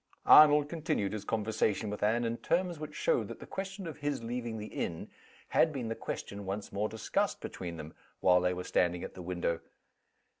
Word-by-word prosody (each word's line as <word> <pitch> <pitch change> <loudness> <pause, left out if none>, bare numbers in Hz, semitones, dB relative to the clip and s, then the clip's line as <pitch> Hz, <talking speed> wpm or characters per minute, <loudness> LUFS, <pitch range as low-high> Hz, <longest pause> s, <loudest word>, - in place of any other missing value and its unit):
Arnold 150 -1 +8
continued 150 - -1
his 105 - -5
conversation 110 -1 0
with 105 - -5
Anne 110 +3 +2
in 115 0 -1
terms 175 +1 0
which 150 0 -7
showed - - +1
that - - -8
the - - -9
question 195 0 -5
of 165 - -6
his 145 -4 -2
leaving 120 -1 -3
the 105 - -5
inn 85 -5 -4 0.4
had 160 - +4
been 125 -6 -4
the - - 0
question 100 -2 -5
once 100 +2 -5
more 105 +2 0
discussed 110 - -1
between 85 -2 -6
them 80 0 -8 0.3
while 90 -1 +5
they 90 0 +2
were 90 - -4
standing 90 -1 +1
at - - -6
the 95 - -9
window. 85 -1 -1
110 Hz, 195 wpm, -32 LUFS, 95-150 Hz, 0.4 s, Arnold